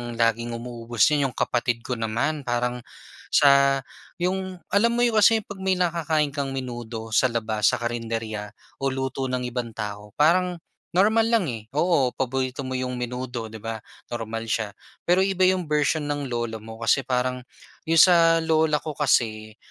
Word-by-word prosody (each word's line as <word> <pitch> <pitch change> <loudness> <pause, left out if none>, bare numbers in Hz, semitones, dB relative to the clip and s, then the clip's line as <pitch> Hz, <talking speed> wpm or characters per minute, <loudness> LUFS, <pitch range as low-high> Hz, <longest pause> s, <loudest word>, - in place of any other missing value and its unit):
laging 115 0 0
umuubos 120 -2 -2
'yan 145 -2 +2
yung 130 - -10
kapatid 120 -1 0
ko 125 -2 -4
naman. 125 +6 -2
Parang 120 +1 -1 0.6
sa 140 -1 +5 0.3
yung 185 0 -3
alam 235 +3 +3
mo 240 - +2
yung 230 -3 +3
kasi 220 +1 +5
'pag 205 -2 -10
may 190 0 +1
nakakain 160 -4 0
kang 140 -2 -3
menudo 120 -3 -6
sa 120 - +4
labas 110 -3 0
sa - - +3
karenderya 115 -3 -4 0.2
o 135 - 0
luto 130 0 -2
ng 125 -1 -2
ibang 120 -2 -4
tao 105 -1 -6
parang 180 +4 +3 0.4
normal 220 +5 +4
lang, 225 - +2
eh. 110 -2 -6
Oo, 150 -5 +2
paborito 130 +1 -2
mo 130 -1 -3
yung 125 -1 -3
menudo, 125 -2 -4
di 110 - -8
ba, 110 0 -6 0.3
normal 115 -1 -4
siya. 110 -2 -2 0.2
Pero 180 +2 +3
iba 190 -1 -2
yung 185 -1 +3
version 150 0 +1
ng 145 -2 -3
lola 120 -2 -3
mo. 110 0 -10
Kasi 135 - +4
parang 125 0 -1 0.5
yung 165 - +3
sa 165 -1 +6
lola 160 -1 +3
ko 155 0 -6
kasi, 110 -7 0
130 Hz, 165 wpm, -24 LUFS, 115-160 Hz, 0.6 s, sa